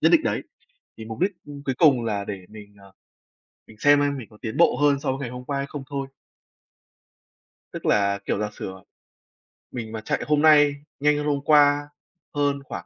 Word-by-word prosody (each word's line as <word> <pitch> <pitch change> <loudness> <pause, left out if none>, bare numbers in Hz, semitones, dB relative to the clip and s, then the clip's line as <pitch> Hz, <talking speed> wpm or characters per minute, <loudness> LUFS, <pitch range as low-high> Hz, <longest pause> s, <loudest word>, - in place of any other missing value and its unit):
nhất - - +5
định 325 - +6
đấy, - - -1 0.6
thì 110 - -8
mục 110 0 -7
đích 195 +3 +2 0.3
cuối 130 - -1
cùng 135 -7 +5
là 100 -3 -2
để 95 -3 -7
mình, 105 -1 -13
ờ, 100 0 -17 0.8
mình 110 - -16
xem 145 +2 +5
xem 145 -1 0
mình 125 -5 -8
có 105 - -17
tiến 110 -2 -5
bộ 170 - +4
hơn 145 -1 +4
so - - -3
với 135 - -4
ngày 135 -4 -4
hôm 125 +1 -8
qua 140 0 -2
hay 140 0 -3
không 145 -2 -7
thôi. 140 -1 -3 1.6
Tức - - -8
là, 100 -1 +2
kiểu, - - -1
giả 105 0 -2
sử, - - -7
à, 95 0 -10 0.9
mình 115 -3 -6
mà 110 -1 -5
chạy - - -2
hôm 150 -1 +2
nay 150 -2 +6 0.2
nhanh 150 +1 +3
hơn 150 - -2
hôm 145 -1 +1
qua, 145 -1 +4 0.4
hơn 145 -1 0
khoảng - - -7
140 Hz, 210 wpm, -24 LUFS, 110-145 Hz, 1.6 s, định